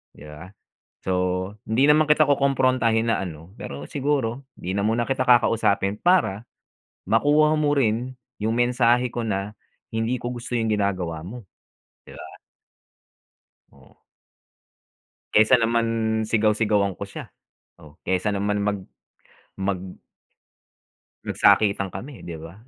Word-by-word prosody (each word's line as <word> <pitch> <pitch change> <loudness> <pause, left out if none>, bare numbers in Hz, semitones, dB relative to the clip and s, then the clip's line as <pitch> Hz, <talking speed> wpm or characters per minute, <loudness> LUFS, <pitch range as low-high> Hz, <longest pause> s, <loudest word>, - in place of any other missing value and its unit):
'Di 75 - -13
ba. 75 +5 -11 0.5
So, 95 - -2 0.5
hindi 130 +7 +3
naman 155 +1 +4
kita 150 +1 +4
kukumprontahin 130 -5 +2
na - - +1
ano. 85 -2 -7
Pero 70 +1 -8
siguro 135 -3 -1
'di 90 - -7
na 100 - 0
muna 115 +2 +1
kita 130 +1 -1
kakausapin 105 -4 +2
para 115 - +1 0.6
makuha 145 +9 +3
mo 145 -1 +1
rin 125 0 0 0.2
yung 110 +2 -1
mensahe 120 0 +2
ko 120 -2 -3
na 100 0 -2 0.4
hindi 115 +2 -1
ko 120 - -4
gusto 120 0 -5
yung 115 -2 0
ginagawa 95 -6 -1
mo, 120 +4 -9 0.6
'di - - -13
ba? - - -11 1.3
Oh. - - -22 1.3
Kaysa 110 +4 +6
naman 115 -1 +1 0.4
sigaw-sigawan 105 -2 +2
ko - - -5
siya, - - -9 0.5
oh. 75 -3 -16
Kaysa 95 +2 -1
naman 105 +1 -1
mag 100 -1 -2 0.7
mag 95 -1 -2 1.5
magsakitan 100 -2 +3
kami 125 +7 -9
'di 85 - -6
ba? 80 +1 -10
115 Hz, 125 wpm, -23 LUFS, 100-125 Hz, 1.5 s, Kaysa